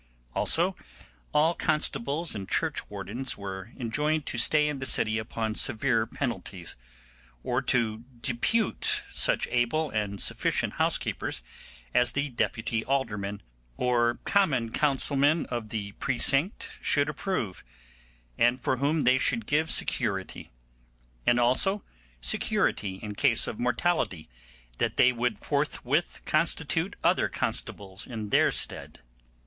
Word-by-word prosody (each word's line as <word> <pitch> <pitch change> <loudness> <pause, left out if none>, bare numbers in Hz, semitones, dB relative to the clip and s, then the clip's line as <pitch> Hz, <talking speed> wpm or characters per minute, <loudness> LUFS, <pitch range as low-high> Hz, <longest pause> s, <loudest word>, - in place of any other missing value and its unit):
Also - - +2 0.6
all 155 +3 +3
constables 150 -1 0
and 100 -2 -6
churchwardens 125 +6 -2
were 95 +1 -7
enjoined 150 +6 0
to - - -4
stay 150 +5 +4
in 150 -2 -3
the 130 - -3
city 110 +1 +3
upon 110 0 -3
severe 115 0 +1
penalties, 95 - -4 0.7
or - - 0
to 115 -2 0 0.2
depute 140 - 0
such - - +2
able 125 +6 +1
and 105 -2 -2
sufficient - - +1
housekeepers 60 - 0 0.5
as 125 0 +3
the 145 +1 -1
deputy 115 -2 -1
aldermen 105 -7 -2 0.3
or 120 -1 +2
Common 135 - +2
Council 140 0 +1
men 145 +4 +3
of 120 -3 -3
the 105 -2 -4
precinct 135 - 0
should 145 -1 +2
approve, 150 - -3 0.8
and 120 +2 +4
for 130 +1 0
whom 145 +4 +1
they 130 0 +4
should 120 -3 +1
give 155 +5 +1
security; 100 -6 0 0.8
and 120 0 +5
also 135 +12 +2 0.4
security 95 - +1
in 105 -1 -4
case 115 +1 +2
of 105 - -5
mortality 125 - 0 0.5
that - - 0
they 125 - +6
would 120 0 -1
forthwith - - -1
constitute - - 0
other - - +3
constables 95 0 -4
in 110 -4 -5
their - - +4
stead. - - -2
120 Hz, 120 wpm, -28 LUFS, 110-145 Hz, 0.8 s, they